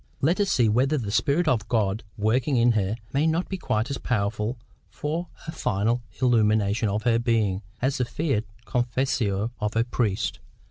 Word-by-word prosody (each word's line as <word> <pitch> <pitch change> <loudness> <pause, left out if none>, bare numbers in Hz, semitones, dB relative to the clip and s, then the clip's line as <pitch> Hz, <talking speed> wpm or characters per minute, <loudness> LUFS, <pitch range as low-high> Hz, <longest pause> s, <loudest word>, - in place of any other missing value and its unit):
Let 170 +8 +2
us 200 -1 +2
see 120 -3 +3
whether 130 +8 +2
the 110 -6 -3
Spirit 145 +9 +2
of 115 -8 +1
God 110 -2 0
working 120 +6 +1
in 120 +1 +5
her 105 -2 0 0.2
may 145 +4 +2
not 165 +3 +1
be 190 - -3
quite 110 -4 -1
as 140 - -3
powerful 105 +1 -1 0.3
for 160 +4 -3 0.2
a - - -2
final 115 - 0 0.2
illumination 110 -3 +3
of 105 +2 -1
her 115 0 +3
being 110 -5 +1 0.2
as 135 +1 +1
the 125 - +2
fiat 130 -3 -1 0.2
confessio 120 -4 0
of 105 0 -2
a 115 - +3
priest. 115 -4 -1
120 Hz, 175 wpm, -25 LUFS, 105-135 Hz, 0.3 s, in